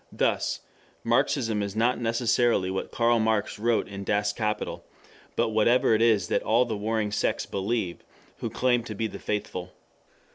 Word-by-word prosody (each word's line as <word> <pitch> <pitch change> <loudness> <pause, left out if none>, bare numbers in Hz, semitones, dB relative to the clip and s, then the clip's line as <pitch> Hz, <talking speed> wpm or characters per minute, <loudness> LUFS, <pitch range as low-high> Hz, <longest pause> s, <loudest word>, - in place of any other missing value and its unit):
Thus - - 0 0.4
Marxism 115 -2 +1
is 100 0 -4
not 120 +3 +2
necessarily 115 -4 +1
what 95 - -3
Karl 120 0 +2
Marx 110 -2 0
wrote 115 +1 +1
in 100 0 -7
Das 105 +1 0
Kapital, 105 -2 -3 0.5
but 115 -1 +1
whatever 110 +2 +3
it 110 - +2
is 110 -6 +3
that - - +1
all 120 +3 +3
the 115 -2 -3
warring 105 0 -1
sects - - 0
believe, 100 -2 -2 0.3
who - - -4
claim 120 -2 +1
to 110 - -6
be 110 - -2
the 110 - -5
faithful. 90 -3 -4
110 Hz, 160 wpm, -27 LUFS, 105-120 Hz, 0.5 s, whatever